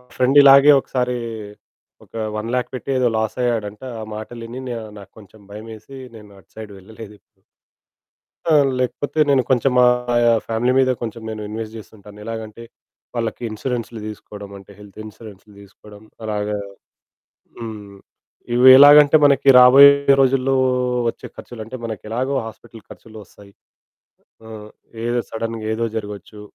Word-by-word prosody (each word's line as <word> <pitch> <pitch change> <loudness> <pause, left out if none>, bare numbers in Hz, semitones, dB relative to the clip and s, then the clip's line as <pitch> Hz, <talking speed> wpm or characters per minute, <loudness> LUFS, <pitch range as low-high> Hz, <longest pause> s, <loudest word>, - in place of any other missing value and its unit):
Friend 130 +3 +2
ఇలాగే 140 +1 +7
ఒకసారి 125 -1 -3 0.9
ఒక - - -20 0.2
100000 120 +3 -3
పెట్టి 130 - -9
ఏదో 125 -1 +1
లాస్ 110 +3 -3
అయ్యాడంట. 110 -4 -3 0.2
ఆ - - -6
మాటలిని 115 +3 -9
న్యా 120 -2 -5 0.2
నాకు 100 -1 -15
కొంచెం 105 +1 -18
భయమేసి 110 +5 -11 0.2
నేను 105 -2 -14
అటు 90 - -26
సైడ్ 110 -2 -9
వెళ్ళలేదు. 110 +2 -13
ఎప్పుడు. - - -46 1.0
ఆ! 165 - 0 0.3
లేకపోతే 130 +4 -3
నేను 135 -2 +3
కొంచెం 130 +1 +1
మా 125 - +6 0.4
ఆహ్, 115 -1 +2
ఫ్యామిలీ 115 +2 0
మీద 130 -1 +2
కొంచెం 115 0 -6
నేను 110 -1 -7
ఇన్వెస్ట్ 110 +1 -7
జేస్తుంటాను. 105 -1 -15
ఎలాగంటే 115 0 -8 0.5
వాళ్ళకి 115 0 -4
ఇన్స్యూరెన్సు‌లు 115 0 -5
దీసుకోవడం 105 -1 -10
అంటే 100 +1 -16
హెల్త్ 105 0 -15
ఇన్స్యూరెన్స్‌ని 105 -1 -14
దీసుకోవడం 105 +1 -17 0.2
అలాగా 105 -1 -3 1.0
హ్మ్. 105 -3 -9 0.6
ఇవి 125 +2 +5
ఎలాగంటే 145 +1 +7
మనకి 140 -1 +3
రాబోయే 135 +3 +8 0.3
రోజుల్లో 135 0 +1 0.5
వచ్చే - - -7
ఖర్చులంటే 115 +1 -9
మనకు 110 -3 -6
ఎలాగో 130 +5 -3
హాస్పిటల్ 115 0 -13
ఖర్చులు 110 -1 -15
వస్తాయి. 100 0 -19 0.9
ఆహ్, 110 -1 -11 0.4
ఏదో 120 0 -1
సడెన్‌గా 115 0 -5
ఏదో 115 +1 -2
జరగొచ్చు. 105 0 -8
115 Hz, 135 wpm, -19 LUFS, 105-125 Hz, 1.0 s, రాబోయే